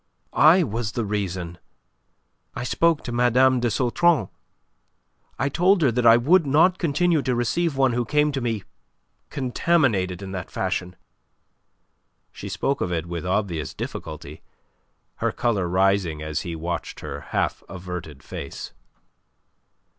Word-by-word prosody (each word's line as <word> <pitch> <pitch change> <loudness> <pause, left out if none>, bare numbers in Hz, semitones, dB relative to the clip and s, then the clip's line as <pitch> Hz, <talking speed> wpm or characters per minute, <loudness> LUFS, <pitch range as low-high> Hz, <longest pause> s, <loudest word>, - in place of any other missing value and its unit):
"I 165 +5 +6
was 115 -4 -3
the 115 - -2
reason. 95 -4 -3 1.0
I - - -4
spoke 165 +5 +1
to 120 - -5
Mme. 125 +2 +3
de 120 0 +1
Sautron. 130 - +2 1.1
I 135 - 0
told 180 +5 +3
her 135 - +4
that 120 0 +2
I 115 0 +8
would 155 +6 +3
not 165 +7 +4
continue 170 0 +2
to 130 -2 -1
receive 135 +6 0
one 135 -2 +3
who 120 +1 0
came 150 +5 +2
to 135 -2 -3
me 115 -4 -2 0.7
contaminated 125 - 0
in 95 - -7
that 90 -3 -5
fashion." 90 0 -3 1.4
She 100 - -8
spoke 115 +9 -1
of 90 - -1
it 85 -1 -2
with 85 0 -5
obvious 90 -7 -2
difficulty, 75 -1 -7 0.8
her - - 0
colour 105 -7 0
rising 95 -3 +1
as 75 0 -3
he 85 -2 -5
watched 85 +1 -5
her - - -6
half - - -1
averted 90 -5 -7
face. - - -7
115 Hz, 140 wpm, -24 LUFS, 90-140 Hz, 1.4 s, I